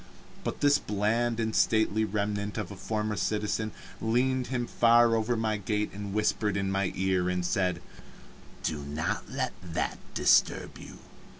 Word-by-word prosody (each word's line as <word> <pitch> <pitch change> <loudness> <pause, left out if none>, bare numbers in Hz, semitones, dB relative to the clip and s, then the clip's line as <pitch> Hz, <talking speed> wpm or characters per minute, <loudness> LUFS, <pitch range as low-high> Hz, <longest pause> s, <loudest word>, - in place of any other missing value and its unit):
But - - -4
this 145 0 +5
bland 115 +3 0
and 110 -1 -1
stately 110 0 +3
remnant 105 0 -2
of 105 - -3
a - - -7
former 105 +2 -2
citizen 105 +2 -1 0.3
leaned 125 +3 +1
him 120 -1 -1
far 120 0 +5
over 115 +2 0
my 110 -1 0
gate 105 +1 -1
and 100 0 -6
whispered 105 -1 +1
in 95 -1 -1
my 95 -1 0
ear, 95 -1 +1
and 90 -1 -1
said: 90 -3 0 0.8
"Do 75 - -1
not 75 +2 -3
let - - -2
that 85 -3 -3 0.2
disturb - - +3
you. - - -11
105 Hz, 155 wpm, -29 LUFS, 95-115 Hz, 0.8 s, this